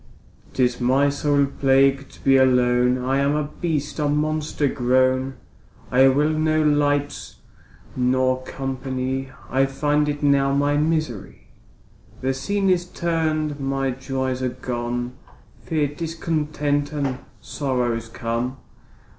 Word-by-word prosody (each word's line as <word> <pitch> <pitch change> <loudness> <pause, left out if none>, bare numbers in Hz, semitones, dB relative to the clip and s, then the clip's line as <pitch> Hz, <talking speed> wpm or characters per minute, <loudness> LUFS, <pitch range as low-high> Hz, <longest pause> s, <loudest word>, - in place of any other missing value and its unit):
'Tis 125 -1 +1
my 135 +3 +3
sole 145 0 +2
plague 135 0 +2
to - - -17
be 135 - +5
alone, 125 -1 +3
I 135 +1 +1
am 140 +1 +2
a 150 - 0 0.2
beast, 155 -4 -2
a 150 -1 +1
monster 150 0 0
grown, 130 +1 +1 0.6
I 130 +2 +6
will 145 +4 +3
no 155 0 +1
light 145 -1 0 0.6
nor 130 0 +1
company, 130 0 -4 0.2
I 135 +1 +3
find 150 +2 +1
it 145 0 -4
now 140 -1 +3
my 145 +1 +2
misery. 150 -9 -2 0.7
The 130 +1 0
scene 195 +9 -1
is 180 -2 +2
turn'd, 155 -4 -1
my 135 -1 -1
joys 130 0 -3
are 130 - 0
gone, 120 0 -4 0.5
Fear, 155 -4 0
discontent, 150 -2 -2
and 140 -4 -2 0.2
sorrows 120 -5 -2
come. 115 +3 -3
135 Hz, 120 wpm, -22 LUFS, 130-150 Hz, 0.7 s, I